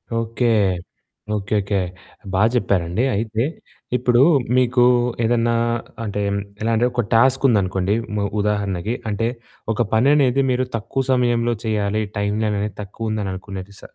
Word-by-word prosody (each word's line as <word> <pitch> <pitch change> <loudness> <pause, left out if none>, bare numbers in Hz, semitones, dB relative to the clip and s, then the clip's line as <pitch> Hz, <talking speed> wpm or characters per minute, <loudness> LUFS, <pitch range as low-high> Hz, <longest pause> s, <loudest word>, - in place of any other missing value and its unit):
Okay. 115 +1 -1 0.9
Okay. 100 +1 -2
Okay. 100 0 -1 0.5
బా 95 - +2
చెప్పారండి. 95 -2 +1
అయితే 110 +2 -1 0.5
ఇప్పుడు 125 0 +3 0.4
మీకు 125 0 +3 0.4
ఏదన్నా 115 0 +2 0.5
అంటే 105 -1 -3 0.4
ఎలా 115 +1 0
అంటే 120 +2 +2
ఒక 120 0 0
టాస్క్ 130 +3 +4
ఉందనుకోండి 95 -2 +1 0.2
మ 100 0 0
ఉదాహరణకి. 105 +1 -1
అంటే 110 +3 0 0.5
ఒక 120 - -1
పని 120 +6 +4
అనేది 135 -1 +3
మీరు 130 +1 +1
తక్కువ 115 +4 -2
సమయంలో 120 -2 +2
చేయాలి 105 0 0 0.2
టైమనేది 105 0 -1
తక్కువ 110 +3 -5
ఉందిని 105 -3 -2
అనుకునే 95 0 -7 0.2
స - - -18
110 Hz, 130 wpm, -21 LUFS, 100-120 Hz, 0.9 s, టాస్క్